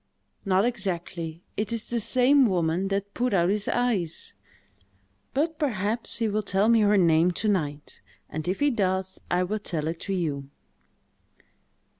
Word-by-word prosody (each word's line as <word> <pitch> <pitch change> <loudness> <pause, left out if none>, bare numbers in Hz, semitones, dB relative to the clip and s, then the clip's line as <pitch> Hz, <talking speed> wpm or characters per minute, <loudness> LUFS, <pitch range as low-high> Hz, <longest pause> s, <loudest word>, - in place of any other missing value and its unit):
"Not 195 +1 +3
exactly: 175 -7 -3
it 210 +1 -2
is 230 -1 -3
the 240 - +1
same 255 +4 +4
woman 175 -1 0
that 200 +1 -2
put 250 -3 0
out 175 -1 +3
his 205 +1 0
eyes; 215 -10 0 1.0
but, 310 +3 0
perhaps, 225 -4 -1
he 230 - +1
will 215 0 0
tell 200 +1 +1
me 230 -1 +5
her 210 -1 +4
name 165 -1 +4
to 215 - -2
night; 150 -8 -2 0.3
and 155 +2 -5
if 185 +6 -2
he 290 0 +4
does, 190 -4 -1
I 180 +1 +2
will 210 +4 -2
tell 160 -6 -3
it 165 +1 -3
to 195 - -3
you." 140 -6 -2
195 Hz, 160 wpm, -26 LUFS, 175-225 Hz, 1.0 s, me